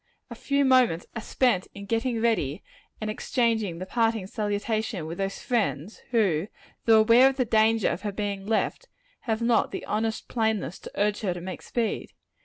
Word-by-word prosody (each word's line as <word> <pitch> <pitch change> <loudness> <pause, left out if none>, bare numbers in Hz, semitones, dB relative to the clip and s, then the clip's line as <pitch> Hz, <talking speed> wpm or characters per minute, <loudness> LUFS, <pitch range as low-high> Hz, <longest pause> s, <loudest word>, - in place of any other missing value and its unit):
A - - -3
few 280 0 0
moments 250 -10 +4
are 225 - -3
spent 235 -5 +1
in 200 - -8
getting 230 +2 -1
ready 205 -9 0 0.4
and 215 - -4
in - - -3
exchanging 220 -8 0
the 185 - -5
parting 225 -1 0
salutation 210 -2 -2
with 165 +3 -6
those 195 0 -2
friends 210 - -1
who, 200 -8 +2 0.4
though 225 -1 +6
aware 240 +4 +6
of 270 - -5
the 255 - +2
danger 220 -1 +3
of 170 - -3
her 205 -1 -3
being 200 -1 -4
left, 225 - -1 0.4
have 220 +1 0
not 235 -1 +3
the - - -6
honest 220 +1 -2
plainness 220 -6 -1
to - - -10
urge 205 0 +1
her 185 -5 -1
to 175 - -6
make 185 +1 -6
speed. 230 -3 -3
220 Hz, 185 wpm, -26 LUFS, 195-230 Hz, 0.4 s, though